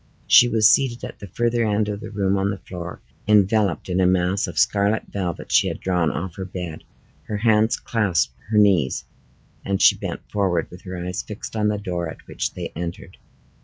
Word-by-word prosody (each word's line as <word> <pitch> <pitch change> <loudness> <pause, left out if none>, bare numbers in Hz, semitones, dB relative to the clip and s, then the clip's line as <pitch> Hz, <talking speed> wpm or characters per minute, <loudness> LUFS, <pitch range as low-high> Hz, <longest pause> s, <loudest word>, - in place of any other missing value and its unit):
She 120 - +7
was 110 -2 +5
seated 120 0 +2
at - - -7
the 100 - -8
further 120 +5 0
end 105 -1 +1
of 105 -1 -3
the 110 +1 -8
room 100 -2 0
on 100 0 0
the 100 - -3
floor, 90 -1 -8 0.3
enveloped 105 -4 +3
in 90 0 0
a 90 - +4
mass 90 +1 +1
of - - -8
scarlet 100 +1 +2
velvet 90 -4 -4
she - - +4
had - - -4
drawn 90 -3 +1
off 90 -1 -5
her 95 - -4
bed; 90 -3 -6 0.4
her 105 - -2
hands 110 +1 +3
clasped 90 - 0 0.2
her 110 - +1
knees, 95 -11 +3 0.6
and 100 -1 -1
she - - +6
bent - - -5
forward, 95 -5 0
with 90 +1 -11
her 95 0 -6
eyes 90 +1 -3
fixed 105 +1 -8
on 105 -1 +1
the 105 0 0
door 90 -4 -3
at - - -11
which - - -4
they - - -5
entered. 85 +1 -6
100 Hz, 200 wpm, -22 LUFS, 90-105 Hz, 0.6 s, She